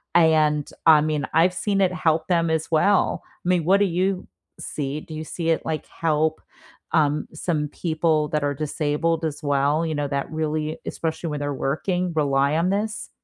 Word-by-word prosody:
and, 155 -3 +4 0.2
I 155 -2 +7
mean, 150 -2 -1
I've 170 +3 +4
seen 195 0 0
it 185 -1 +2
help 165 -3 +1
them 170 -2 +2
as 160 0 -1
well. 195 +5 +2 0.2
I 180 - 0
mean, 175 -3 +2
what 195 +3 +4
do 205 - +4
you 185 +1 -1 0.3
see? 145 0 -4
Do 160 - -11
you 155 0 -5
see 165 +1 -3
it, 160 - 0
like, 155 -1 -3
help, 160 -1 0 0.5
um, 150 -2 +2
some 155 -2 -1
people 155 -1 0
that 150 -1 -1
are 145 - 0
disabled 155 +2 -1
as 150 -1 -4
well, 145 +3 +1
you 160 - -2
know, 145 -1 -1
that 140 0 -2
really, 155 0 -2
especially 165 0 -3
when 150 - -3
they're 145 0 -2
working, 175 +6 -1
rely 140 -1 +2
on 170 +3 +1
this? 215 +2 -2
155 Hz, 185 wpm, -23 LUFS, 150-170 Hz, 0.5 s, I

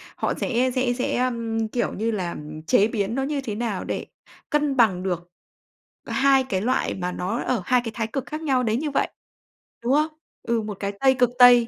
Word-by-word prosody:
họ - - -1
sẽ 255 +1 +1
sẽ 255 -1 +2
sẽ, 245 0 -1
ờm, 230 -3 0
kiểu 240 +2 -1
như 225 +3 -1
là, 185 -5 -2 0.3
chế 205 - +5
biến 220 0 -1
nó 270 - 0
như 280 0 -1
thế 220 -5 -4
nào 220 -4 -2
để - - -3 0.4
cân 295 -2 +1
bằng 190 -6 +4
được 175 -2 -3 0.8
2 270 0 +4
cái 185 - 0
loại 255 +5 +1
mà 180 -1 -3
nó 185 +6 -2
ở 245 -6 0
2 250 -1 +3
cái 225 - -3
thái 225 -2 -1
cực 260 +4 -3
khác 305 +1 -5
nhau 265 -5 +2
đến 225 +1 +1
như 295 -1 -2
vậy, - - +1 0.7
đúng 245 +3 +2
không? 305 +2 +4 0.4
Ừ, 235 -1 0
một 210 -2 -5
cái 200 0 -2
Tây, 265 -1 +5
cực 245 -2 +5
Tây 245 -2 +8
235 Hz, 210 wpm, -24 LUFS, 215-260 Hz, 0.8 s, Tây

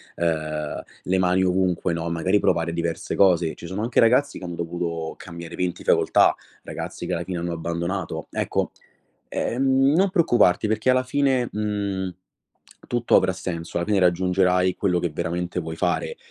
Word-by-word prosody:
ehm, 80 -2 -2 0.2
le 95 +1 +1
mani 95 0 +2
ovunque, 90 -1 +1
no. 85 0 -3
Magari 85 +5 +1
provare 85 -3 +1
diverse 85 -1 -3
cose. 85 -4 +3
Ci 85 - -9
sono 95 +4 -4
anche 120 +1 +1
ragazzi 125 +5 +3
che - - -8
hanno 85 -1 -5
dovuto 85 -1 -3
cambiare 85 -1 -9
20 90 -1 -3
facoltà, - - +4 0.3
ragazzi - - -6
che - - -2
alla 85 0 -2
fine 90 -1 -4
hanno 85 0 -3
abbandonato; 85 0 -3
ecco, - - -1 0.6
e - - -3
ehm, 135 +2 +3
non 190 +3 +3
preoccuparti 120 - +3
perché 110 +3 0
alla 130 0 +4
fine, 130 -2 +1
mhmm, 100 -3 -2 0.7
tutto 120 -1 +2
avrà 95 0 +4
senso, 85 -2 -5
alla 85 - -1
fine 105 -1 +1
raggiungerai 90 0 +2
quello 90 -3 +1
che 85 - -1
veramente 90 +3 -3
vuoi 80 0 -6
fare. 475 - -1
90 Hz, 165 wpm, -24 LUFS, 85-105 Hz, 0.7 s, facoltà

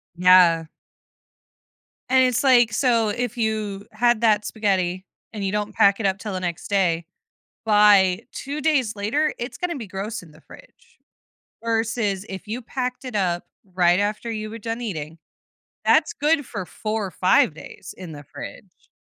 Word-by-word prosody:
Yeah. 180 -2 +5 1.4
And 260 0 +5
it's 250 -1 +1
like, 245 -4 +5
so 230 -2 +2
if 245 +2 -3
you 215 -3 -2
had 240 +1 +2
that 215 -2 +3
spaghetti 190 -4 -1 0.3
and 210 -2 -5
you 195 - -1
don't 210 0 -2
pack 200 +1 +4
it 225 - -2
up 190 0 +1
till 210 0 -5
the 185 - -2
next 175 -3 -4
day, 175 -4 +1 0.6
by 205 -2 +5
2 285 +2 -5
days 270 -9 +1
later, 230 +10 0
it's 240 +3 -5
gonna 355 -1 -2
be 235 -6 -7
gross 195 +4 -5
in 170 -3 -16
the 150 - -19
fridge - - -18 0.7
versus 225 -3 -1
if 190 +2 -8
you 230 +4 -4
packed 250 +1 -4
it 250 -3 -6
up 175 -3 0 0.3
right 175 0 +4
after 210 +3 -2
you 215 -1 -4
were 225 - -7
done 225 +2 -4
eating, 160 -8 -5 0.7
that's - - +4
good 295 0 +1
for 200 -6 -6
4 215 +3 -3
or 190 - -6
5 180 -3 +3
days 160 - -11
in 180 -3 -8
the 145 - -10
fridge. - - -11
210 Hz, 165 wpm, -23 LUFS, 190-235 Hz, 1.4 s, Yeah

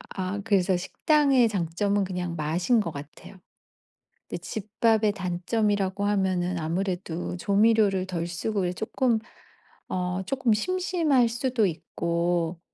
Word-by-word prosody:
아 190 +1 -2
그래서 190 -4 +2
식당의 270 - +3
장점은 200 +2 0
그냥 180 -2 -3
맛인 175 +9 +1
것 170 -6 -2
같아요. 145 +6 -10 0.9
근데 - - -3
집밥의 215 0 +1
단점이라고 195 +1 -1
하면은 185 -3 0
아무래도 175 +1 -3
조미료를 200 -1 +3
덜 170 -2 -3
쓰고 190 +3 -2
이제 175 - -1
쪼끔 225 +3 0 0.7
어 180 0 -2
쪼끔 255 -4 +1
심심할 330 - +2
수도 240 -2 0
있고 170 0 -1
195 Hz, 265 characters per minute, -26 LUFS, 175-220 Hz, 0.9 s, 식당의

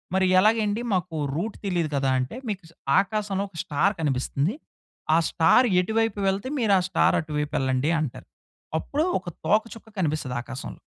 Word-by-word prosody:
"మరి 190 0 +3
ఎలాగండి, 215 +1 +2
మాకు 180 -2 -1 0.2
రూట్ 205 +7 -3
తెలీదు 175 -5 0
కదా!" 135 -1 +1
అంటే, 130 - -5
"మీకు 200 -4 -4 0.4
ఆకాశంలో 200 -1 -2
ఒక 180 - -14
స్టార్ 195 +8 +1
కనిపిస్తుంది. 140 - 0 0.6
ఆ - - +6
స్టార్ 170 +10 +4
ఎటువైపు 220 +2 0
వెళ్తే, 195 +5 -2
మీరు 215 -5 +4
ఆ - - 0
స్టార్ - - +3
అటువైపు 150 -2 -3
వెళ్ళండి" 130 +3 +1
అంటారు. 145 -6 -5 0.5
అప్పుడు 295 - -1
ఒక 180 - -7 0.2
తోక 215 +7 +4
చుక్క 225 - -14
కనిపిస్తుంది 150 -6 -1
ఆకాశంలో. 130 +1 -8
185 Hz, 155 wpm, -25 LUFS, 150-210 Hz, 0.6 s, ఆ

